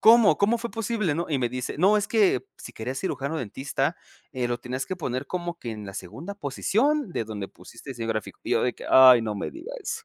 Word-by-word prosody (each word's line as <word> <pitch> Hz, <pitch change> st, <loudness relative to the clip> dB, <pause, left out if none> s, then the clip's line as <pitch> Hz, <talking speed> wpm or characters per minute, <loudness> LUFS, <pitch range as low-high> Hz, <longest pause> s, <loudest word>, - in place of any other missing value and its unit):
¿Cómo 225 Hz, -1 st, +7 dB
cómo 215 Hz, +4 st, +3 dB
fue 235 Hz, 0 st, -4 dB
posible, 220 Hz, -7 st, -1 dB
no?" 170 Hz, +3 st, -2 dB
Y 140 Hz, -, +1 dB
me 120 Hz, -2 st, +1 dB
dice: 125 Hz, +1 st, -4 dB
"No, 195 Hz, +5 st, +5 dB
es 205 Hz, -, -2 dB
que 220 Hz, -, +3 dB
si -, -, -9 dB
querías 130 Hz, +4 st, -4 dB
cirujano 160 Hz, -4 st, -2 dB
dentista, 135 Hz, -, -2 dB, 0.4 s
eh, 125 Hz, -3 st, -1 dB
lo 120 Hz, -, 0 dB
tenías 125 Hz, +2 st, -4 dB
que 185 Hz, -, -4 dB
poner 130 Hz, -5 st, -3 dB
como 175 Hz, -1 st, -4 dB
que 120 Hz, -, -5 dB
en 105 Hz, -1 st, -7 dB
la 95 Hz, -, -7 dB
segunda 115 Hz, -, -7 dB
posición 220 Hz, -, 0 dB
de 115 Hz, -, -1 dB
donde 105 Hz, -3 st, -5 dB
pusiste 115 Hz, +8 st, -12 dB
diseño 115 Hz, -3 st, -5 dB
gráfico", 110 Hz, -2 st, -3 dB
y -, -, -5 dB
yo -, -, +3 dB
de 125 Hz, -, +1 dB
que: -, -, -10 dB
"Ay, 130 Hz, -2 st, +9 dB
no 110 Hz, -1 st, -2 dB
me -, -, -3 dB
digas". 455 Hz, +5 st, -6 dB
140 Hz, 235 wpm, -26 LUFS, -, 0.4 s, Ay